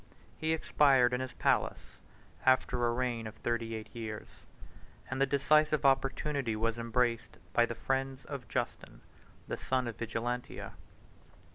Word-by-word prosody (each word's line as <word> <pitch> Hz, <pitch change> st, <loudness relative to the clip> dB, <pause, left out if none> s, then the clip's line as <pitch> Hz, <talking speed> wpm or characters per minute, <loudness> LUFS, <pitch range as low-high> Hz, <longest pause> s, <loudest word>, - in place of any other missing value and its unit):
He 160 Hz, 0 st, 0 dB
expired 135 Hz, -5 st, +4 dB
in 125 Hz, -, 0 dB
his 130 Hz, -, -5 dB
palace, -, -, 0 dB, 0.4 s
after 125 Hz, -2 st, +3 dB
a -, -, +2 dB
reign 120 Hz, -2 st, -1 dB
of 110 Hz, -, -9 dB
thirty 115 Hz, 0 st, -2 dB
eight 110 Hz, -1 st, -8 dB
years; 110 Hz, -2 st, -5 dB, 0.9 s
and 130 Hz, +1 st, -2 dB
the 135 Hz, -, +4 dB
decisive 150 Hz, +2 st, +3 dB
opportunity 135 Hz, -2 st, +1 dB
was 115 Hz, +1 st, 0 dB
embraced 115 Hz, 0 st, 0 dB, 0.2 s
by 120 Hz, 0 st, +4 dB
the 120 Hz, -, -4 dB
friends 135 Hz, +2 st, -2 dB
of 135 Hz, -4 st, -6 dB
Justin, -, -, -4 dB, 0.5 s
the -, -, -3 dB
son 130 Hz, -1 st, 0 dB
of 115 Hz, -, -5 dB
Vigilantia. 120 Hz, +2 st, -3 dB
125 Hz, 140 wpm, -32 LUFS, 115-135 Hz, 0.9 s, expired